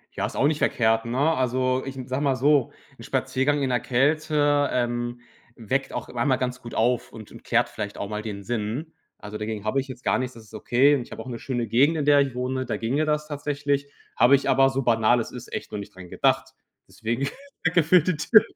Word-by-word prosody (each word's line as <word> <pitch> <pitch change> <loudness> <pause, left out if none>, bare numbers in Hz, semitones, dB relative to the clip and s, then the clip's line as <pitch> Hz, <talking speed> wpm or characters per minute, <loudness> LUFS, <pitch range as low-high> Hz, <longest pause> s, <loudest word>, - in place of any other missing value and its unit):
Ja, - - -1
ist - - -10
auch 140 - +2
nicht 150 -1 0
verkehrt, 115 -1 +2
ne? 120 +2 -3 0.2
Also, 130 0 0
ich 135 0 -6
n 125 - -7
sag 130 +2 -2
mal 140 -3 +2
so, 140 -1 +3 0.3
'n - - -10
Spaziergang 140 +2 0
in 130 - 0
'ner 125 -1 +1
Kälte, 145 +2 +2
ähm, 120 0 -2 0.3
weckt 130 +4 -2
auch 125 - -5
einmal 130 +2 +1
ganz 125 0 -3
gut 120 - -9
auf 120 +2 +1
und 110 -2 -11
und - - -13
klärt - - +2
vielleicht 105 0 -6
auch 100 - -4
mal 105 0 -3
den 100 -2 -6
Sinn. 120 - -3 0.2
Also, 105 0 -8
dagegen 105 -1 -4
hab 110 - -1
ich 135 +1 0
jetzt 125 -1 -10
gar - - +2
nichts, 130 -1 -4
das 115 - -12
ist 105 - -20
okay. 135 +4 +3
Und 130 - -2
ich - - -11
habe - - -7
auch - - -13
'ne 120 -2 -5
schöne 120 -4 -3
Gegend, 140 +9 +3
in 150 - -1
der 145 -1 +6
ich 135 -3 0
wohne, 130 +1 -2
da - - -2
ginge 135 +7 0
das 150 0 -1
tatsächlich. 145 -1 -2 0.3
Habe 135 +3 +6
ich 140 - -1
aber, 135 0 +5
so 135 0 -2
banal 115 0 +3
es 115 - -4
ist, 125 - -10
echt - - -5
noch 105 - -4
nicht 100 - -10
dran 90 -2 -11
gedacht. - - +1 0.3
Deswegen, 120 +5 -3 0.4
danke 170 0 +3
für 165 +2 +5
die 180 +1 0
Tipp. 215 +8 +5
130 Hz, 240 wpm, -25 LUFS, 115-145 Hz, 0.4 s, der